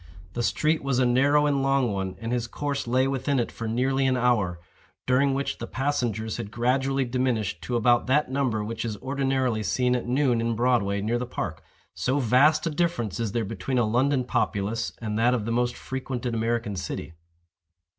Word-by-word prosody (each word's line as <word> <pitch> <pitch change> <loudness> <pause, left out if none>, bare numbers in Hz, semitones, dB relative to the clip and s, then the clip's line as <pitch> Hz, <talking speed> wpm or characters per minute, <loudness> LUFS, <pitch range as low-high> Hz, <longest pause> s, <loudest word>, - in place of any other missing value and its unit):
The 120 - -2
street 155 +6 +1
was 135 -3 0
a 130 - +3
narrow 140 +4 +4
and 140 -2 +1
long 135 -3 +2
one, 95 -1 -3
and 115 +2 -4
his 120 -1 -1
course 140 +1 -3
lay 130 +2 +2
within 135 +1 0
it 120 - -1
for 115 - -5
nearly 130 +4 +1
an 130 -1 +2
hour, 110 -8 +1 0.5
during 135 +2 +3
which 140 +1 -2
the 115 - -5
passengers 120 -6 -1
had 100 - -5
gradually 130 +4 +1
diminished 120 -5 -1
to 125 - -2
about 120 +1 +3
that 150 +4 +3
number 130 -6 0
which 110 +2 -4
is 110 -3 -3
ordinarily 135 -3 0
seen 125 +3 +1
at 120 - -3
noon 125 -2 +2
in 115 0 0
Broadway 110 -4 +1
near 115 +4 0
the 125 - -4
park—so 120 - -4
vast 145 +5 +4
a 165 - 0
difference 150 - -1
is 115 -3 -1
there 115 -2 0
between 115 +5 -3
a 120 - +3
London 130 +4 +2
populace 110 -1 -1
and 110 -1 -3
that 120 +2 +4
of 110 -4 -3
the 115 - -2
most 120 +1 0
frequented 130 -2 -4
American 115 -2 -1
city. 90 -2 -5
125 Hz, 190 wpm, -26 LUFS, 115-135 Hz, 0.5 s, narrow